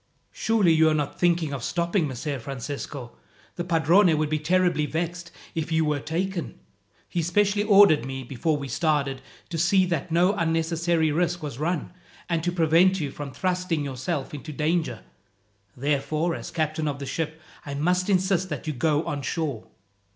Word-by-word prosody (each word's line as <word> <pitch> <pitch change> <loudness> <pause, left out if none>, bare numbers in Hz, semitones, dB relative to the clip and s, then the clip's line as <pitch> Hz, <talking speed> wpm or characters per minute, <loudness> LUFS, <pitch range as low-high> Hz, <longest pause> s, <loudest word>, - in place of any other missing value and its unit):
"Surely 215 -7 +2
you 160 0 +5
are 155 - +2
not 145 -2 -2
thinking 170 -4 +2
of 130 -4 -4
stopping, 170 +1 0
Messer 140 +2 -4
Francisco. 135 0 -6 0.4
The 175 - -3
padrone 170 +1 +4
would 155 0 -1
be 155 - +1
terribly 175 -1 +2
vexed 170 +2 -3 0.2
if 165 -1 -3
you 160 0 +2
were 150 -1 0
taken. 170 +4 -3 0.5
He 175 - -1
specially 205 +4 +2
ordered 200 -7 +6
me, 130 0 -5
before 150 +5 -1
we 140 -1 -5
started, 140 -1 0 0.3
to 165 -2 -3
see 185 +3 +4
that 170 -1 -2
no 175 +4 +4
unnecessary 165 -2 +1
risk 175 +2 0
was 140 -4 -5
run, 170 +1 -1 0.4
and 165 -2 -1
to 175 - 0
prevent 175 +2 +4
you 145 -4 -3
from 145 -1 -7
thrusting 180 -1 -1
yourself 130 +1 -3
into 150 +2 -7
danger. 155 -5 -1 0.7
Therefore, 150 +5 0
as - - -6
captain 155 -1 -1
of 145 -2 -2
the 140 - -6
ship, 160 +3 -3 0.2
I 140 -1 -6
must 180 +6 +1
insist 190 -1 +2
that - - -5
you 155 - -2
go 150 +3 +1
on 145 -1 -3
shore." 140 -4 -3
160 Hz, 170 wpm, -25 LUFS, 145-175 Hz, 0.7 s, ordered